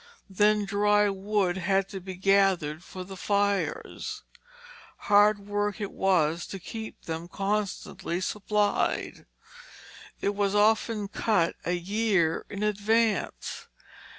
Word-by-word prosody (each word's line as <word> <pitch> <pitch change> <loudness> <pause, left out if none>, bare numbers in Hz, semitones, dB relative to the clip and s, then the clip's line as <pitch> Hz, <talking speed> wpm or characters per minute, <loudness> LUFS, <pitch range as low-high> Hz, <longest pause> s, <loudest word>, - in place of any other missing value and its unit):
Then 210 +2 +3
dry 205 +1 +3
wood 195 -2 0
had 195 +1 +1
to 195 - -6
be 190 0 -7
gathered 185 -5 +2
for 185 0 -8
the 190 +1 -9
fires; 200 +1 -1 0.7
hard 205 +1 +4
work 205 +1 -2
it 205 -2 -4
was 170 -3 +1
to 195 - -6
keep 220 +4 -8
them 165 +1 -5
constantly 195 -3 -2
supplied. 210 +2 -1 0.9
It 200 - 0
was 200 0 0
often 215 0 +2
cut 195 -4 +1
a 180 - 0
year 185 -2 0
in 205 0 -4
advance. 210 +2 0
200 Hz, 115 wpm, -27 LUFS, 185-210 Hz, 0.9 s, hard